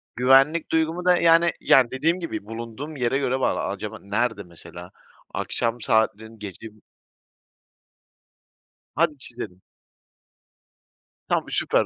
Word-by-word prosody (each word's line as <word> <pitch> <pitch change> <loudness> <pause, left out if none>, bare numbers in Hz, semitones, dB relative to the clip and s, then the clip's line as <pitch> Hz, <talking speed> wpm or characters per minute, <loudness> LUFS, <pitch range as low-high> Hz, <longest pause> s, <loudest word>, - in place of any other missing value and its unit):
Güvenlik 135 +6 +4
duygumu 160 +2 0
da, 180 -1 +5
yani 165 +1 +5
yani, 125 -3 +5
dediğim 160 +7 0
gibi 165 - -5
bulunduğum 115 +7 -7
yere 130 0 0
göre 130 -1 0
var. - - +1
A - - -2
acaba - - -6
nerede 105 +1 -1
mesela? 85 +1 -12 0.4
Akşam 115 0 -2
saatlerin 110 0 0
gece 105 +2 -8
mi? 110 -1 -18 2.1
Hadi 160 -2 +2
çizelim. 110 -8 -4 1.7
Tam - - 0
süper. - - +1
125 Hz, 115 wpm, -24 LUFS, 110-155 Hz, 2.1 s, da